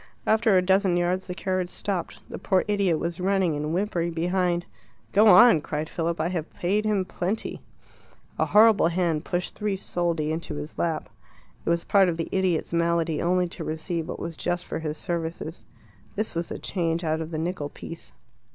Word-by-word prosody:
After 220 -2 +4
a 180 - +3
dozen 190 -1 +3
yards 180 +2 0
the 180 - -5
carriage 185 -2 -1
stopped. 190 -2 -4
The - - -7
poor 190 -2 +1
idiot 200 -5 +2
was 170 +2 -3
running 190 -3 +1
and 150 +1 -2
whimpering 175 -2 -1
behind. 175 +1 0 0.5
"Go 210 +2 +5
on," 230 -6 +8
cried 150 +1 -3
Philip. 170 -1 -2
"I 160 +2 0
have 170 -3 -3
paid 205 +5 0
him 205 -3 +1
plenty." 185 +4 -3 0.8
A - - +3
horrible 215 -3 +6
hand 170 -2 0
pushed 175 0 -2
three 210 -2 -2
soldi 170 -4 -1
into 160 -1 -4
his 150 +1 -7
lap. 165 -2 -1 0.6
It - - -2
was 170 0 +1
part 195 -2 +4
of 165 - -2
the 165 - -3
idiot's 185 -4 0
malady 170 -2 +1
only 180 +1 +2
to - - -7
receive 160 +1 -3
what - - -4
was 165 -1 -5
just 175 +2 -2
for - - -4
his 155 -1 -4
services. 165 -1 -4 0.5
This 215 +2 -2
was 170 0 -3
the - - -4
change 170 -2 -1
out 160 0 0
of 160 - -5
the 160 - -4
nickel 160 -2 -3
piece. 165 +3 -9
175 Hz, 190 wpm, -26 LUFS, 165-190 Hz, 0.8 s, on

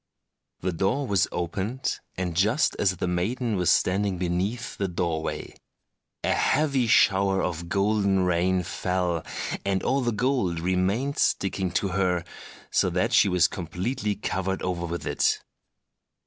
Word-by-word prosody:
The 95 - -1
door 95 - 0
was 100 -8 +2
opened, 95 +9 -2 0.2
and 90 -2 -2
just 110 - +2
as 95 -2 +2
the - - -2
maiden 110 +7 -1
was 90 -3 +1
standing 95 0 +2
beneath 95 +7 -2
the 100 - -1
doorway, 85 -3 -3 0.7
a - - +2
heavy 140 -5 +2
shower 95 -4 +4
of 85 -1 -3
golden 100 -1 +2
rain 90 +1 +1
fell, 90 -2 -1 0.4
and 95 -1 0
all 135 +2 +1
the 120 -1 0
gold 115 -8 0
remained 95 +10 0
sticking 95 -1 +1
to 100 0 0
her, 90 -2 0 0.5
so - - +3
that - - 0
she 100 - +5
was 90 -1 +4
completely 100 +6 -3
covered 95 -1 -2
over 85 -2 -2
with 85 +1 -4
it. - - +1
95 Hz, 140 wpm, -26 LUFS, 90-105 Hz, 0.7 s, she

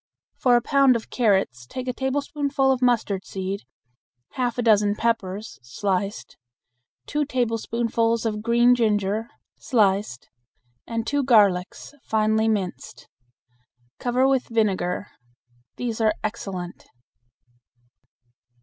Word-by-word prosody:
For 250 -2 +4
a 240 - +2
pound 275 -2 +4
of 225 - -5
carrots 190 - +1
take 255 - -6
a 250 - -1
tablespoonful 275 +1 0
of 260 -1 0
mustard 220 -6 +1
seed, 190 -3 -5 0.7
half 245 -3 -2
a 245 - 0
dozen 210 -2 +3
peppers 215 -2 -2
(sliced), 195 - -3 0.7
two 295 0 -1
tablespoonfuls 230 -3 -1
of 210 -1 -2
green 235 +2 +4
ginger 215 -1 0 0.3
(sliced), 200 - 0 0.6
and 230 -1 -3
two 285 +3 0
garlics 205 -4 +2
(finely 220 -1 +1
minced). 185 - -3 0.9
Cover 250 +2 +2
with 270 -2 +1
vinegar. 200 -5 0 0.7
These 235 -2 -3
are 215 -1 +3
excellent. 195 -5 -5
225 Hz, 105 wpm, -24 LUFS, 200-245 Hz, 0.9 s, For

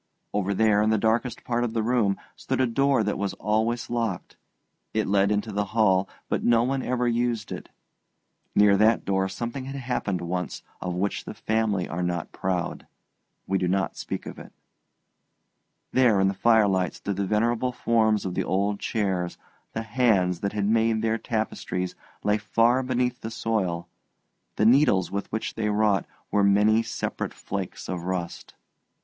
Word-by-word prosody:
Over 100 -1 0
there, 105 0 +4
in 105 - +2
the 110 - +3
darkest 115 +3 0
part 120 0 0
of 115 -2 -2
the 115 -2 0
room, 110 -4 +2 0.2
stood - - -3
a 130 - +4
door 135 +3 +2
that - - -1
was 100 -1 -2
always 110 +3 0
locked. 115 -6 -3 0.6
It 110 - +2
led 100 0 +2
into 105 +1 -1
the 105 0 0
hall, 95 -3 +4 0.2
but - - -1
no 115 -1 +4
one 135 +2 0
ever 125 -1 0
used 120 -2 0
it; - - -6 0.9
near 105 -1 +6
that 110 +2 +3
door 95 -1 +1
something 120 +6 -5
had 135 +1 -6
happened 120 -8 -2
once 90 0 -3 0.2
of 90 -1 -3
which 100 +3 -2
the - - -7
family 110 -4 0
are 85 +2 -3
not 90 -2 -2
proud. 90 -2 -3 0.6
We 95 0 0
do 90 - 0
not 95 -1 0
speak - - -5
of - - -8
it. - - -11 1.4
There 120 -6 +4
in 95 0 +4
the - - -1
firelight 100 -3 +3
stood 100 -1 -4
the 100 -1 -1
venerable 115 +4 +1
forms 110 -4 +2
of 90 - -2
the - - 0
old 100 +2 0
chairs; 95 -5 -1 0.4
the 115 - -3
hands 105 -7 +2
that 100 0 -2
had 105 -1 0
made 110 +1 +2
their 115 0 +1
tapestries 110 -5 -2 0.3
lay 105 +1 +2
far 115 +5 +3
beneath 125 -1 -1
the 110 - -4
soil, 95 -7 -1 0.7
the 105 - +2
needles 120 -6 +4
with 100 0 -4
which 110 - -3
they 110 -1 -1
wrought 105 -3 +2 0.2
were 105 - +3
many 105 +3 +4
separate 115 0 -4
flakes - - -5
of 90 -2 -4
rust. 90 -2 -4
105 Hz, 170 wpm, -26 LUFS, 95-115 Hz, 1.4 s, near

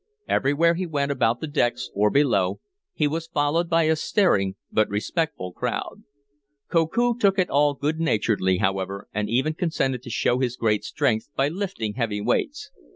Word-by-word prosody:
Everywhere 150 +5 +2
he 180 +1 -3
went 145 -3 -1
about 120 -3 +1
the 160 - -3
decks, 120 - -1
or 105 +1 +3
below, 100 -9 +2 0.3
he 150 - 0
was 165 +2 -3
followed 165 +2 0
by 165 -1 +3
a 160 0 +3
staring 105 - +1 0.2
but 110 - +2
respectful 105 - -2
crowd. - - -4 0.7
Koku 225 +9 +2
took 200 -2 +3
it 185 -2 +1
all 145 +1 +3
good 150 +4 -2
naturedly, 105 - +1
however, 95 +1 -2
and 105 0 -2
even 130 +7 +1
consented 145 -7 -1
to 125 - -10
show 120 +2 +1
his 125 -2 -1
great 105 -2 +1
strength 125 -6 -1
by 135 +1 +2
lifting 175 - -3
heavy 115 -4 -2
weights. 105 - -1
140 Hz, 165 wpm, -24 LUFS, 105-165 Hz, 0.7 s, or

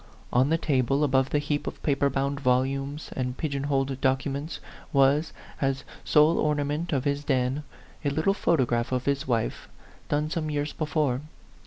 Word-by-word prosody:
On 130 +3 +4
the 165 - +3
table, 135 -2 +1
above 135 -1 +2
the - - +1
heap 145 0 -1
of - - -6
paper 140 -1 +2
bound 140 +1 -1
volumes 135 +3 0
and 125 -1 -2
pigeon 140 -3 -2
holed 135 -2 0
documents, 140 +3 -1 0.3
was, 140 +3 +3 0.3
as 135 -1 0 0.2
sole 155 +2 +4
orna 150 -1 +1
ment 150 +4 -2
of 135 -4 +1
his 145 0 -1
den, 130 0 +1 0.4
a 145 - +2
little 155 +7 +2
photograph 125 - +1
of 125 -1 -1
his 140 -1 +1
A - - -6
PHANTOM - - -1
LOVER. 115 -2 +2
65 - - -14
wife, - - -25
done 150 +1 +1
some 160 -3 -1
years 145 0 -2
before. 150 -4 0
140 Hz, 185 wpm, -27 LUFS, 130-150 Hz, 0.4 s, On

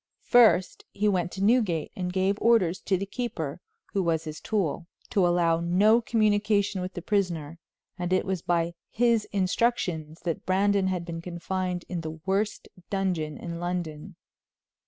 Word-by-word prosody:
First, 225 -7 +4
he 210 +1 0
went 180 -3 +1
to 195 - -3
Newgate 205 -8 +2
and 180 -1 -3
gave 190 +2 +1
orders 200 -7 +3
to 190 - +2
the 195 - -3
keeper, 180 - -4 0.3
who 195 - +1
was 165 -2 0
his 155 -1 -7
tool, 175 -5 -1 0.2
to 190 -3 +3
allow 170 -1 +2
no 200 +7 +4
communication 210 -3 +1
with 185 +1 -5
the 175 - -5
prisoner, 170 -6 -1 0.4
and 175 0 -2
it 185 +1 +2
was 190 -3 -2
by 170 -1 0 0.2
his 230 -2 +2
instructions 180 -5 -1
that 165 -3 -3
Brandon 195 +1 +2
had 180 -2 -2
been 165 -1 -5
confined 180 +1 -3
in 175 -2 -3
the 160 0 -6
worst 200 +2 -1 0.2
dungeon 180 -6 -1
in 170 -1 -6
London. 175 -4 -4
185 Hz, 155 wpm, -27 LUFS, 170-205 Hz, 0.4 s, First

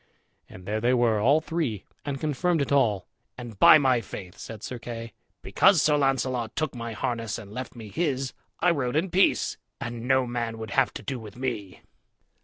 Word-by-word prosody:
And 90 - -12
there 105 +2 -2
they 125 +2 +3
were, 115 -3 +3
all 140 +9 +4
three, 155 - -2 0.2
and 140 -2 -4
confirmed 160 +4 0
it 140 - -1
all 115 -9 +2 0.3
"And, 120 -5 -9
by 155 - +9
my 130 -5 +3
faith," 95 -4 -9
said 110 -2 -9
Sir 125 - -5
Kay, 115 0 -7 0.3
"because 195 -3 +4
Sir 150 +1 +4
Launcelot 130 -4 0
took 155 -1 -1
my 115 -2 -5
harness 115 0 -2
and 105 -3 -10
left 130 +2 -6
me 110 -3 -9
his, 135 - -1 0.3
I 180 - +5
rode 135 -5 -1
in 170 +4 +1
peace, 190 +2 +2 0.2
and 120 0 -5
no 130 -1 +3
man 120 -2 -3
would 110 -2 -7
have 135 +2 +3
to - - -7
do 135 -3 -3
with 110 -1 -11
me." 110 -7 -4
125 Hz, 195 wpm, -26 LUFS, 115-140 Hz, 0.3 s, by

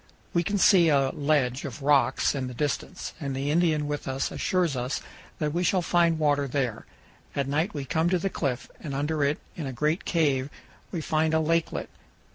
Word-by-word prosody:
We 170 - +3
can 205 +4 -1
see 180 -3 +6
a 135 -2 +3
ledge 140 -3 +1
of 140 0 -7
rocks 135 -3 +3
in 135 -3 -2
the 125 - -7
distance, 150 +6 -3
and 140 -4 -3
the 140 +2 -1
Indian 160 -2 +2
with 145 0 -4
us 135 0 -1
assures 180 -6 0
us 125 +2 -2 0.4
that 150 -1 -1
we 175 +2 0
shall 180 0 +2
find 170 -1 +3
water 145 -2 +2
there. 125 -5 -2 0.5
At 140 -1 0
night 155 +7 0
we 140 -2 -3
come 160 +5 +1
to 185 - +3
the 180 - -1
cliff, 135 -8 -2
and 140 -4 -5
under 150 +2 0
it, 140 +2 +1 0.2
in 155 -5 -4
a - - -3
great 150 +7 0
cave, 145 -5 +1 0.4
we 170 - -3
find 155 +1 +1
a - - +4
lakelet. 165 +1 0
150 Hz, 200 wpm, -27 LUFS, 135-165 Hz, 0.5 s, see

